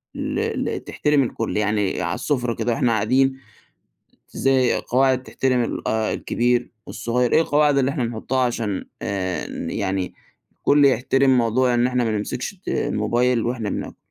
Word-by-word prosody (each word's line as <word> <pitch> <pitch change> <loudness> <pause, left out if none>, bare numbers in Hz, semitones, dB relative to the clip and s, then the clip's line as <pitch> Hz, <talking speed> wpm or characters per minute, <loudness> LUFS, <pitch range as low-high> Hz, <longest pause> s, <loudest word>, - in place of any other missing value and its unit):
ل - - -2 0.4
ل - - -3
تحترم 150 -2 +1
الكل؟ 115 -2 -3
يعني 105 -2 0
على - - -1
السفرة 125 -5 -1
كده 115 +1 -1
وإحنا 120 +1 +1
قاعدين، 130 +5 +2 0.9
زي 130 -2 +2
قواعد 130 0 +1
تحترم 130 -1 0
ال - - -4
آآ، 110 -1 0
الكبير 120 0 0 0.2
والصغير. 120 +2 -1
إيه 160 - +5
القواعد 145 -2 +3
اللي 135 0 +2
إحنا 135 -4 -2
نحطها 115 +3 -3
علشان 115 -5 -1 0.2
آآ، 95 -5 -2 0.2
يعني 95 -1 -2 0.5
كل 145 0 +4
يحترم 135 0 +3
موضوع 120 +2 +2
إن 120 0 +3
إحنا 125 -1 0
ما 115 - 0
نمسكش 110 - -3
الت 195 -1 -14
الموبايل 120 +2 +1
وإحنا 115 -3 -2
بناكل؟ - - -5
125 Hz, 155 wpm, -22 LUFS, 110-130 Hz, 0.9 s, إيه